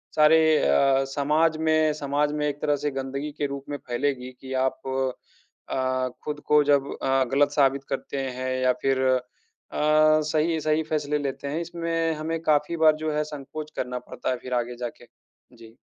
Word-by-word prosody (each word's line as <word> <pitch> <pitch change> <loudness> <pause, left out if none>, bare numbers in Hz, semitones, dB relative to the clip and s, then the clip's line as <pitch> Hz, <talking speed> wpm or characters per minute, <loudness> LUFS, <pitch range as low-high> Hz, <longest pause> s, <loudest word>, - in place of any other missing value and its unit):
सारे 155 +1 +6 0.2
अ, 135 - +3
समाज 150 +3 +1
में 155 -1 +2
समाज 145 0 0
में 150 0 0
एक 145 0 -4
तरह 150 -1 +2
से 145 - 0
गंदगी 135 +2 -4
के 145 - +1
रूप 140 0 -6
में 145 - -3
फैलेगी 130 0 -2
कि 130 0 -7
आप 130 - -2 0.9
अ, 130 -1 0 0.2
खुद 150 -1 -3
को 150 0 +5
जब 140 -1 +2
अ, 135 0 +3
गलत 145 +1 +4
साबित 140 -2 +2
करते 135 +1 -4 0.2
हैं 130 0 -2
या 125 0 +4
फिर 135 -1 +2
अ, 130 0 +3 0.5
सही 155 +1 +3
सही 155 +1 +1
फैसले 150 -1 -1
लेते 140 0 -4
हैं, 155 +4 -2
इसमें 165 -1 -1
हमें 160 +2 -3
काफ़ी 150 +2 +1
बार 160 -1 +5
जो 155 - 0
है 150 0 +1
संकोच 150 +1 -8
करना 125 0 -3
पड़ता - - -6
है 125 - -1
फिर 125 - -5
आगे 120 0 -1
जा 120 - -2
के। 120 - -15 0.5
जी। 115 0 -15
145 Hz, 180 wpm, -25 LUFS, 135-155 Hz, 0.9 s, सारे